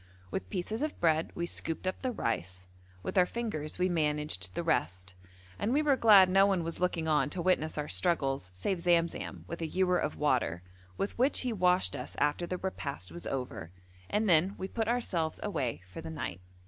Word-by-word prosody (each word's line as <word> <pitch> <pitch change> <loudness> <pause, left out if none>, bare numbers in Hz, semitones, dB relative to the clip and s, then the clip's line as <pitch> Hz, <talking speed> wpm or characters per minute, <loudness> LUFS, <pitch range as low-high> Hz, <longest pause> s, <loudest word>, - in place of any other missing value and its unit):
With 90 - -4
pieces 215 - -3
of 305 0 -2
bread 160 -1 +2
we 170 - -1
scooped 165 0 -3
up 185 - -2
the 255 - -1
rice, 95 - -3 0.4
with - - +1
our 180 - +5
fingers 195 -11 -4
we 180 +1 +2
managed 150 - -1
the - - -1
rest, 90 +3 -1 0.5
and 220 - 0
we 295 +4 +3
were 290 -2 +4
glad 210 -6 +7
no 195 +2 +5
one 190 -4 +1
was 165 0 -4
looking 175 -3 0
on 150 -2 +3
to 180 - -4
witness 170 -3 +1
our 150 0 -2
struggles 135 - 0
save 135 - -2
Zamzam 170 -1 0
with 170 +1 -6
a 165 - -1
ewer 180 +2 +2
of 150 - -2
water, 125 - +1 0.3
with 200 - -2
which 265 +3 +3
he 250 -2 -1
washed 180 -2 +3
us - - -6
after 150 +4 +1
the 185 - -2
repast 140 - -5
was 85 +1 -7
over, 125 -11 -4 0.4
and 215 +1 +1
then 180 +2 +4
we 190 - -4
put 225 +2 -2
ourselves 185 -10 0
away 130 - -2
for 95 - -8
the 160 - -7
night. 100 - -5
170 Hz, 200 wpm, -31 LUFS, 140-190 Hz, 0.5 s, glad